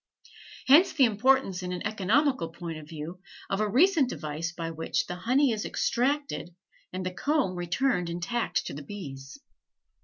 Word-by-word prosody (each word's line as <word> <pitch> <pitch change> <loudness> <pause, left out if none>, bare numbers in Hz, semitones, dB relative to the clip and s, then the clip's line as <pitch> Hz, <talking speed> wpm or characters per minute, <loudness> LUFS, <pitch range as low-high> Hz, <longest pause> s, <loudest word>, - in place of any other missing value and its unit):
Hence 305 +8 +6
the 270 - +5
importance 225 -3 +2
in 180 0 -4
an 180 -1 -4
economical 215 - +1
point 165 -1 -7
of 150 0 -13
view, 165 +3 -7 0.3
of 195 - 0
a 215 0 +1
recent 295 - +4
device 155 0 -4
by 165 -1 -5
which 160 0 -1
the - - -5
honey 255 +8 +2
is 215 -2 -2
extracted 265 - -1 0.4
and 185 0 -4
the 185 - -1
comb 280 -5 0
returned 180 +1 0
intact 175 +8 -1
to - - -5
the 145 - -6
bees. 140 - -8
190 Hz, 160 wpm, -28 LUFS, 170-260 Hz, 0.4 s, Hence